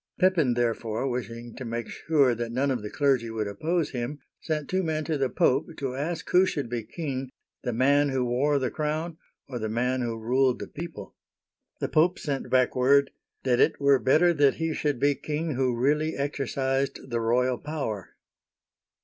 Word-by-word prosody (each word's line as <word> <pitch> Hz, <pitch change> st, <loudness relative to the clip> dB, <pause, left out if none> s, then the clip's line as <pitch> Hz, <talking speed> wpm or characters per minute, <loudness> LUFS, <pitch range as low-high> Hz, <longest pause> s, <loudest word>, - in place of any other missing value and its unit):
Pepin, 175 Hz, -10 st, +3 dB
therefore, 115 Hz, 0 st, -1 dB
wishing 120 Hz, -2 st, -5 dB
to 130 Hz, -, -6 dB
make 115 Hz, -1 st, -4 dB
sure 145 Hz, -6 st, +2 dB
that 115 Hz, 0 st, -4 dB
none 135 Hz, +3 st, +1 dB
of 125 Hz, -4 st, -1 dB
the 105 Hz, -, -5 dB
clergy 135 Hz, -4 st, +1 dB
would 110 Hz, -2 st, -2 dB
oppose 155 Hz, -, -1 dB
him, 125 Hz, +3 st, -3 dB, 0.2 s
sent 155 Hz, -3 st, -3 dB
two 185 Hz, +1 st, 0 dB
men 155 Hz, -3 st, -1 dB
to 160 Hz, 0 st, -1 dB
the 135 Hz, -2 st, 0 dB
Pope 130 Hz, +4 st, +2 dB
to 135 Hz, -2 st, -3 dB
ask 160 Hz, +4 st, -3 dB
who 180 Hz, -, +6 dB
should 145 Hz, -9 st, -2 dB
be 120 Hz, -1 st, -1 dB
king, 135 Hz, +2 st, -5 dB, 0.3 s
the 125 Hz, -, -2 dB
man 140 Hz, +5 st, +3 dB
who 130 Hz, -2 st, 0 dB
wore 135 Hz, +4 st, +2 dB
the 130 Hz, -3 st, -1 dB
crown 155 Hz, +2 st, -2 dB, 0.3 s
or 125 Hz, -3 st, -5 dB
the 110 Hz, -1 st, -3 dB
man 125 Hz, +3 st, 0 dB
who 115 Hz, -2 st, -2 dB
ruled 125 Hz, +3 st, +2 dB
the -, -, -6 dB
people 160 Hz, -, -8 dB, 0.4 s
} -, -, -54 dB
The -, -, 0 dB
Pope 170 Hz, +4 st, +3 dB
sent 140 Hz, -3 st, -3 dB
back 130 Hz, -1 st, +3 dB
word, 140 Hz, +2 st, +4 dB, 0.2 s
" -, -, -52 dB
That 125 Hz, -2 st, +2 dB
it -, -, +3 dB
were 140 Hz, -1 st, +4 dB
better 155 Hz, +8 st, +4 dB
that 145 Hz, -3 st, +4 dB
he 165 Hz, -1 st, -1 dB
should 145 Hz, -4 st, -1 dB
be 145 Hz, +2 st, +3 dB
king 150 Hz, +3 st, -3 dB
who 130 Hz, -1 st, +1 dB
really 150 Hz, +6 st, +1 dB
exercised 135 Hz, -1 st, -2 dB
the 115 Hz, -1 st, 0 dB
royal 125 Hz, +2 st, +1 dB
power." 140 Hz, -, -5 dB
135 Hz, 190 wpm, -27 LUFS, 120-150 Hz, 0.4 s, who